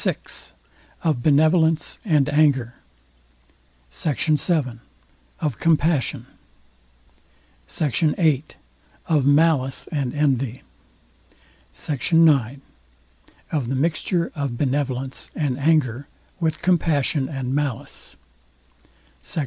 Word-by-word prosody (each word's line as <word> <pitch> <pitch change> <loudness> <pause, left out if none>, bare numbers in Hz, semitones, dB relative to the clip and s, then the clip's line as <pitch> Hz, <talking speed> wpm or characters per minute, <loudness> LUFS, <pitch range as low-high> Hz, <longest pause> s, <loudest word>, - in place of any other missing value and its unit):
VI - - 0 0.9
OF 155 -7 0
BENEVOLENCE 160 +3 +3
AND 150 -8 +3
ANGER 140 -5 +2 1.2
SECT. 150 - -2
VII 150 -6 +1 0.6
OF 150 -7 -2
COMPASSION 160 -3 +1 1.4
SECT. 150 -6 -1 0.2
VIII 155 -6 +2 0.6
OF 150 -4 +1
MALICE 145 -3 +2
AND 140 -4 -2
ENVY 135 -4 0 1.1
SECT. 150 +3 -3
IX 140 -6 +4 0.9
OF 145 -7 -1
THE 135 - -1
MIXTURE 170 +4 0
OF 140 -5 -3
BENEVOLENCE 135 -1 -2
AND 140 -4 -1
ANGER 140 -4 +1 0.3
WITH 160 -2 -1
COMPASSION 155 -6 +1
AND 135 -3 -3
MALICE 145 -4 -4 1.1
SECT. - - -4
145 Hz, 90 wpm, -22 LUFS, 130-160 Hz, 1.4 s, IX